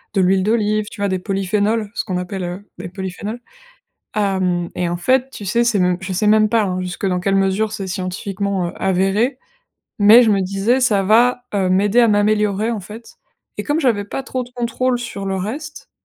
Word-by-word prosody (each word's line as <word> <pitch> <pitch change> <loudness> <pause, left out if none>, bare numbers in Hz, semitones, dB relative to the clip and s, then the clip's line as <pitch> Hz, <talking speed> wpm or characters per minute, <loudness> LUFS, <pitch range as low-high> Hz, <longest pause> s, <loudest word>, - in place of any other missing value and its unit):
de 190 - +3
l'huile 190 +1 +3
d'olive, 215 0 +1
tu 200 - -10
vois? 200 - +1
Des 185 -1 -1
polyphénols, 205 +3 -1
ce - - -2
qu'on 185 -3 -3
appelle, 180 +1 -4
heu, 180 +4 -6
des - - -6
polyphénols. 190 +5 -6 0.8
Hem 185 -4 0
et 175 -1 -1
en 175 - -3
fait, 260 +7 +1
tu 205 - -9
sais, 235 +5 +2
c'est 230 -4 +1
même 180 -1 +2
je 190 0 -4
sais 210 +4 0
même 215 0 +4
pas, 225 -2 +3
hein, 185 -1 -2
jusque 180 +2 -4
dans 180 -1 0
quelle 195 +2 0
mesure, 195 +3 +1
c'est 200 -3 -5
scientifiquement, 190 0 -3
heu, - - -7
avéré, 195 +7 +1 0.6
mais 215 +4 +8
je 225 - +3
me 200 -1 +2
disais, 195 +7 +1
ça 210 -6 +2
va, 245 +5 +3
heu, 195 -2 +1
m'aider 205 +5 +3
à 235 - +5
m'améliorer, 210 +1 +1
en 220 -3 -3
fait 215 +5 -12 0.4
et - - -1
comme 295 +1 0
j'avais 215 -7 +1
pas 270 - -4
trop 260 -1 -3
de 245 - -15
contrôle 245 +1 -1
sur 200 -5 -6
le 190 0 -1
reste, 280 +11 -6
205 Hz, 210 wpm, -19 LUFS, 190-225 Hz, 0.8 s, mais